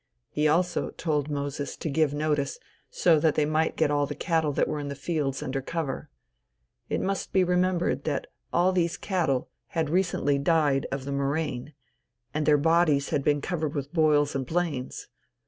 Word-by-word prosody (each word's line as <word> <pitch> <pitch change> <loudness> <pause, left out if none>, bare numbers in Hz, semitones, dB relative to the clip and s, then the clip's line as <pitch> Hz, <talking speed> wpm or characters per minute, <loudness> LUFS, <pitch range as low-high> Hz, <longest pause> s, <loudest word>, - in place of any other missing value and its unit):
He 150 +1 +2
also 175 +4 +1
told 150 -3 -1
Moses 145 -1 -3
to - - -4
give 155 0 +2
notice, 145 -2 -1 0.3
so 165 -3 +3
that 155 0 +2
they 150 - +3
might 155 +1 +1
get 155 -2 +2
all 145 -1 +2
the - - -5
cattle 160 -3 +1
that - - +1
were 150 - -2
in 145 - -4
the 140 - -4
fields 145 -2 -2
under 135 -1 -2
cover. 155 -1 -4 0.8
It - - 0
must 195 0 -2
be 190 - +4
remembered 180 -6 +1
that 145 -3 -1 0.3
all 180 +2 +3
these 170 -2 0
cattle 165 -10 -1 0.3
had 160 -2 +1
recently 170 -6 +1
died 145 -3 +2
of 135 -1 -3
the 140 - -4
murrain, 140 0 -2 0.6
and 150 -1 -1
their 150 -1 +6
dead 145 - -3
bodies 160 -4 +3
had 140 - 0
been 145 0 +2
covered 160 -4 -2
with 140 +1 -4
boils 150 -3 +3
and 135 - -1
blains. 155 -3 -2
150 Hz, 180 wpm, -27 LUFS, 140-165 Hz, 0.8 s, their